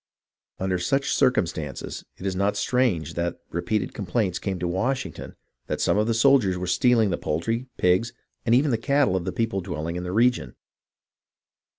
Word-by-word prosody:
Under 95 Hz, -1 st, -1 dB
such 135 Hz, +10 st, 0 dB
circumstances 80 Hz, -, 0 dB
it 95 Hz, -, -9 dB
is 95 Hz, -1 st, -1 dB
not 100 Hz, +2 st, +1 dB
strange 120 Hz, -, +1 dB
that 85 Hz, 0 st, -2 dB
repeated 105 Hz, +6 st, -1 dB
complaints 95 Hz, -2 st, -1 dB
came 95 Hz, -1 st, -3 dB
to 90 Hz, 0 st, -2 dB
Washington 125 Hz, +10 st, -2 dB, 0.3 s
that -, -, -2 dB
some -, -, +2 dB
of 105 Hz, -, +1 dB
the 115 Hz, -, +1 dB
soldiers 115 Hz, -7 st, +4 dB
were 90 Hz, -, -3 dB
stealing 110 Hz, +3 st, +3 dB
the 85 Hz, -, -1 dB
poultry, 115 Hz, +11 st, -2 dB
pigs, 90 Hz, +6 st, +2 dB, 0.3 s
and 115 Hz, 0 st, +3 dB
even 140 Hz, +3 st, +3 dB
the 115 Hz, -, +1 dB
cattle 140 Hz, -4 st, +2 dB
of 90 Hz, -2 st, -1 dB
the -, -, -1 dB
people 115 Hz, -4 st, -1 dB
dwelling 85 Hz, -1 st, -4 dB
in 90 Hz, -, -4 dB
the 90 Hz, -, -4 dB
region. 120 Hz, +4 st, +2 dB
100 Hz, 175 wpm, -25 LUFS, 90-120 Hz, 0.3 s, soldiers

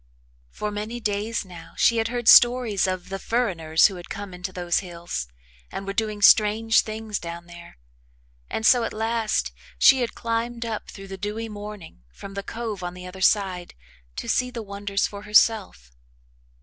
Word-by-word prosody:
For 210 Hz, -, -4 dB
many 215 Hz, +3 st, -5 dB
days 210 Hz, 0 st, -2 dB
now 175 Hz, -3 st, -12 dB
she 230 Hz, -, +4 dB
had 225 Hz, 0 st, +1 dB
heard 240 Hz, -1 st, -4 dB
stories 240 Hz, -6 st, +6 dB
of 185 Hz, -1 st, -4 dB
the 195 Hz, 0 st, -4 dB
"furriners" 175 Hz, -11 st, +2 dB
who 195 Hz, -3 st, +2 dB
had 175 Hz, -, -11 dB
come 200 Hz, -2 st, -6 dB
into 180 Hz, +1 st, -6 dB
those 175 Hz, -2 st, 0 dB
hills 170 Hz, -, -5 dB, 0.4 s
and 195 Hz, -, -5 dB
were 195 Hz, -, -4 dB
doing 210 Hz, -1 st, -2 dB
strange 220 Hz, +2 st, +5 dB
things 215 Hz, -1 st, -5 dB
down 170 Hz, 0 st, -7 dB
there, 175 Hz, 0 st, -13 dB, 0.7 s
and 220 Hz, -, -3 dB
so 245 Hz, -1 st, +6 dB
at -, -, -3 dB
last 225 Hz, 0 st, -1 dB, 0.3 s
she 265 Hz, -2 st, +6 dB
had 240 Hz, -, -2 dB
climbed 235 Hz, 0 st, -2 dB
up 225 Hz, -2 st, -5 dB
through 195 Hz, -1 st, -10 dB
the 195 Hz, 0 st, -7 dB
dewy 215 Hz, +3 st, -4 dB
morning 205 Hz, -, -9 dB
from 195 Hz, -, -10 dB
the 200 Hz, -, -4 dB
cove 225 Hz, -2 st, -5 dB
on 175 Hz, 0 st, -5 dB
the 180 Hz, 0 st, -9 dB
other 185 Hz, +1 st, -9 dB
side 190 Hz, -3 st, +1 dB, 0.4 s
to -, -, -6 dB
see 250 Hz, 0 st, +1 dB
the 235 Hz, -3 st, -6 dB
wonders 200 Hz, 0 st, -2 dB
for 200 Hz, -1 st, -6 dB
herself. 210 Hz, -, +2 dB
205 Hz, 175 wpm, -24 LUFS, 185-225 Hz, 0.7 s, stories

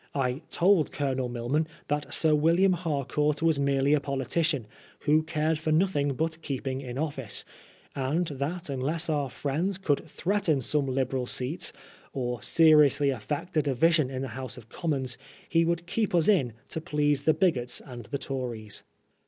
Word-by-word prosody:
I 130 Hz, 0 st, 0 dB
told 175 Hz, -3 st, +3 dB
Colonel 130 Hz, -3 st, -1 dB
Milman 125 Hz, +6 st, -1 dB, 0.2 s
that 145 Hz, 0 st, -2 dB
Sir 160 Hz, -1 st, +3 dB
William 170 Hz, +5 st, +4 dB
Harcourt 150 Hz, -2 st, -1 dB
was 160 Hz, -3 st, +3 dB
merely 140 Hz, 0 st, +2 dB
a 150 Hz, -, +4 dB
poli 140 Hz, -2 st, -3 dB
tician, 150 Hz, -3 st, 0 dB, 0.4 s
who 155 Hz, +1 st, +4 dB
cared 155 Hz, 0 st, 0 dB
for 155 Hz, 0 st, -1 dB
nothing 155 Hz, -5 st, +2 dB
but 160 Hz, +3 st, -2 dB
keeping 135 Hz, -2 st, -3 dB
in 125 Hz, -2 st, -6 dB
of&ce; 135 Hz, -7 st, -2 dB, 0.5 s
and 145 Hz, +6 st, 0 dB
that 150 Hz, +6 st, -3 dB
unless 150 Hz, +5 st, -1 dB
our 145 Hz, -3 st, 0 dB
friends 160 Hz, +9 st, -1 dB
could 150 Hz, -7 st, 0 dB
threaten 190 Hz, -6 st, +1 dB
some 140 Hz, +2 st, 0 dB
Liberal 130 Hz, -1 st, -1 dB
seats, 130 Hz, +9 st, -2 dB, 0.4 s
or 125 Hz, -4 st, -2 dB
seriously 150 Hz, -2 st, +5 dB
affect 140 Hz, -, -4 dB
a -, -, +6 dB
division 150 Hz, +1 st, +2 dB
in 130 Hz, 0 st, -4 dB
the 135 Hz, -, -4 dB
House 125 Hz, -1 st, -6 dB
of 115 Hz, -, -13 dB
Commons, 135 Hz, -7 st, -2 dB, 0.3 s
he 165 Hz, 0 st, +3 dB
would 170 Hz, 0 st, 0 dB
keep 205 Hz, +1 st, 0 dB
us 165 Hz, -2 st, +3 dB
in 150 Hz, -, +3 dB, 0.2 s
to 160 Hz, -, -4 dB
please 150 Hz, -3 st, +1 dB
the 155 Hz, +2 st, +4 dB
bigots 125 Hz, -10 st, +2 dB
and 120 Hz, -4 st, -10 dB
the 140 Hz, -, -3 dB
Tories. 120 Hz, -6 st, -5 dB
145 Hz, 165 wpm, -28 LUFS, 130-160 Hz, 0.5 s, a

